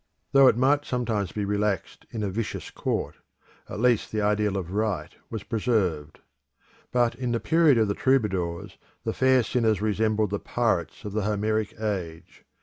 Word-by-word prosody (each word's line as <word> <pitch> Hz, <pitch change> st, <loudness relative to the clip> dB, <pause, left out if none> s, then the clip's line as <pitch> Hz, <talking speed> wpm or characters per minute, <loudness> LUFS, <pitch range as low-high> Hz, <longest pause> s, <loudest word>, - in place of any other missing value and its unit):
Though 135 Hz, -1 st, +7 dB
it 120 Hz, -, +4 dB
might 140 Hz, +3 st, +3 dB
sometimes 115 Hz, -, -2 dB
be 105 Hz, -1 st, -3 dB
relaxed 105 Hz, -2 st, -2 dB
in 110 Hz, -2 st, -4 dB
a 100 Hz, -, -1 dB
vicious 110 Hz, +3 st, -4 dB
court, -, -, -3 dB, 0.5 s
at -, -, -5 dB
least 120 Hz, -2 st, +2 dB
the 110 Hz, -, -1 dB
ideal 105 Hz, -1 st, +1 dB
of 90 Hz, -2 st, -4 dB
right 105 Hz, -1 st, -2 dB
was 110 Hz, -3 st, -5 dB
preserved. 95 Hz, -11 st, -1 dB, 0.7 s
But 120 Hz, -1 st, +2 dB
in 120 Hz, 0 st, -3 dB
the 115 Hz, -, 0 dB
period 160 Hz, -3 st, +4 dB
of 110 Hz, -1 st, +3 dB
the 100 Hz, -, 0 dB
Troubadours 95 Hz, -10 st, 0 dB, 0.2 s
the -, -, -2 dB
fair 130 Hz, -1 st, +4 dB
sinners 110 Hz, -4 st, +1 dB
resembled 110 Hz, 0 st, +1 dB
the 100 Hz, -, -1 dB
pirates 115 Hz, -4 st, -1 dB
of 105 Hz, -, -5 dB
the 110 Hz, -, 0 dB
Homeric 105 Hz, 0 st, -1 dB
age. 90 Hz, -5 st, -5 dB
110 Hz, 165 wpm, -26 LUFS, 100-120 Hz, 0.7 s, Though